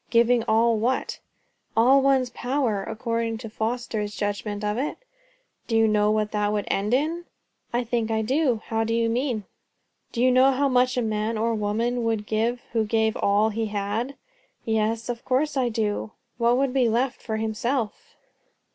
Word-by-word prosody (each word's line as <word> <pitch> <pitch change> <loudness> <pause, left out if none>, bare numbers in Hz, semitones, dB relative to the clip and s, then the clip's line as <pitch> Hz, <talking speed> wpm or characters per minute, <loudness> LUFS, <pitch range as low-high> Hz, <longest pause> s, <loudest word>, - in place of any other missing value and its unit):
"Giving 235 0 +4
all 225 +1 +3
what?" 250 +4 -1 0.6
"All 260 +4 +6
one's 265 -2 +2
power, 245 -6 -1
according 230 +1 -2
to 225 -1 -8
Foster's 220 -2 -3
judgment 205 0 -3
of 210 0 0
it." 285 - -2 0.7
"Do 225 - +1
you 225 0 +5
know 210 -1 +3
what 215 0 0
that 210 -1 0
would 210 -1 -1
end 210 +5 +1
in?" 325 +5 -1 0.5
"I 240 +1 0
think 230 -1 -1
I 220 0 0
do. 255 -1 +1
How 225 0 0
do 225 +1 -1
you 230 0 +1
mean?" 240 -3 -1 0.7
"Do - - -5
you 255 - +5
know 260 +2 +5
how 280 +2 +2
much 255 -1 +2
a 245 - +1
man 215 +1 -1
or 230 +2 +1
a - - 0
woman 230 +3 -1
would 225 -2 -1
give 230 +3 -1
who 225 -2 +2
gave 220 0 +1
all 205 +2 +2
he 225 +1 -2
had?" 210 +6 -2 0.5
"Yes, 220 +1 0
of 240 -1 -4
course 280 +4 0
I 255 -3 +1
do." 215 -1 -2 0.3
"What 235 +1 +3
would 270 -1 +1
be 255 -4 +3
left 245 +3 0
for 220 -2 -3
himself?" 235 - -2
230 Hz, 180 wpm, -25 LUFS, 215-250 Hz, 0.7 s, All